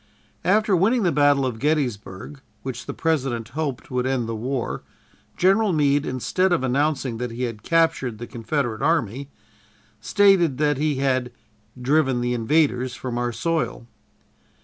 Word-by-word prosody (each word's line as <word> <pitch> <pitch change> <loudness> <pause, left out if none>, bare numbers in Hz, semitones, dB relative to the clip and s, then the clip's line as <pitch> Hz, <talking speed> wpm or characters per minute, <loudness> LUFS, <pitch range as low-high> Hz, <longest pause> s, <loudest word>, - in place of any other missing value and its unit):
After 205 +2 +3
winning 220 +7 +2
the 175 - +2
battle 145 -2 +3
of 120 -4 -3
Gettysburg, 135 -4 -2 0.2
which 125 -1 -6
the - - -4
President 135 -8 -1
hoped 140 -2 -4
would 125 0 0
end 130 -3 -1
the 115 - -3
war, 125 +3 -3 0.6
General 195 +2 +3
Meade, 145 -1 +2
instead 185 +9 0
of 170 -7 +2
announcing 135 -2 0
that 125 0 -2
he 115 +2 -5
had 115 -4 -4
captured 165 -8 +1
the 120 - -6
Confederate 120 -1 -3
army, 140 -4 0 0.7
stated 175 - +3
that 145 -2 +1
he 150 -1 +1
had 130 -2 0 0.5
"driven 135 0 +2
the 120 0 -1
invaders 125 0 +1
from 120 -2 -4
our 120 0 -1
soil." 160 -2 -2
135 Hz, 150 wpm, -23 LUFS, 120-155 Hz, 0.7 s, After